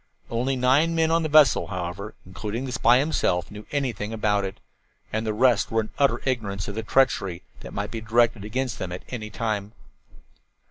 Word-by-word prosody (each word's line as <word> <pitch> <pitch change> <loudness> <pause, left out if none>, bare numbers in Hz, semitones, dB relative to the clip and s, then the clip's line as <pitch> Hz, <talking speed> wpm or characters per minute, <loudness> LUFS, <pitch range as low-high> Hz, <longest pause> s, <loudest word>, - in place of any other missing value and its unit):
Only 125 +4 0
nine 135 +6 +3
men 160 0 +2
on 165 0 +3
the 155 - -1
vessel, 150 -3 +5
however, 90 +4 -5
including 105 +6 -5
the 130 - -4
spy 125 -1 +4
himself, 110 - 0
knew 105 +1 -10
anything 120 -7 -2
about 105 -2 +1
it, 95 0 -5 0.5
and 110 +1 -1
the - - +1
rest 115 0 +3
were 115 0 +1
in 110 - -7
utter 140 -1 +3
ignorance 105 -7 -2
of 100 - -4
the 110 - -3
treachery 100 -7 +1 0.2
that - - -10
might 100 +1 -4
be 115 - -5
directed 115 -1 +2
against 115 0 -3
them 90 - -4
at 90 - -6
any 110 -4 -5
time. 105 0 -3
110 Hz, 190 wpm, -25 LUFS, 100-130 Hz, 0.5 s, vessel